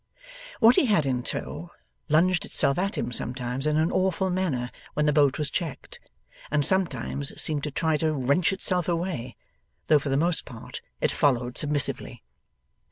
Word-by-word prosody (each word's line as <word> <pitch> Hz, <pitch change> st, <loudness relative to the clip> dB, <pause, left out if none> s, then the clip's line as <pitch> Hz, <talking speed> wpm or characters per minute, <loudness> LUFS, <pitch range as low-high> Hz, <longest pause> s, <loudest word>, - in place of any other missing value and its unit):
What 235 Hz, +1 st, +6 dB
he 270 Hz, -, +4 dB
had 175 Hz, -9 st, +2 dB
in 130 Hz, -2 st, 0 dB
tow, 155 Hz, +6 st, -4 dB, 0.4 s
lunged 175 Hz, +4 st, +3 dB
itself 140 Hz, -, 0 dB
at 195 Hz, +2 st, -1 dB
him -, -, -2 dB
sometimes 125 Hz, +3 st, -2 dB
in 150 Hz, 0 st, +1 dB
an 160 Hz, +2 st, +1 dB
awful 190 Hz, 0 st, 0 dB
manner 150 Hz, -10 st, -1 dB, 0.2 s
when 150 Hz, -, +1 dB
the 150 Hz, -, +3 dB
boat 140 Hz, -2 st, +3 dB
was 150 Hz, -2 st, -2 dB
checked, 165 Hz, -6 st, -5 dB, 0.5 s
and 145 Hz, -1 st, +1 dB
sometimes 145 Hz, -7 st, -1 dB
seemed 150 Hz, -2 st, 0 dB
to -, -, -2 dB
try 160 Hz, +2 st, 0 dB
to 160 Hz, +1 st, 0 dB
wrench 145 Hz, +6 st, +1 dB
itself 185 Hz, -3 st, 0 dB
away, 170 Hz, -8 st, -3 dB, 0.5 s
though 150 Hz, -, +6 dB
for 140 Hz, -, -4 dB
the 135 Hz, -, +1 dB
most 170 Hz, +3 st, +1 dB
part 115 Hz, -4 st, -9 dB, 0.2 s
it -, -, +2 dB
followed 125 Hz, -3 st, +1 dB
submissively. 145 Hz, -1 st, +1 dB
150 Hz, 165 wpm, -26 LUFS, 135-175 Hz, 0.5 s, What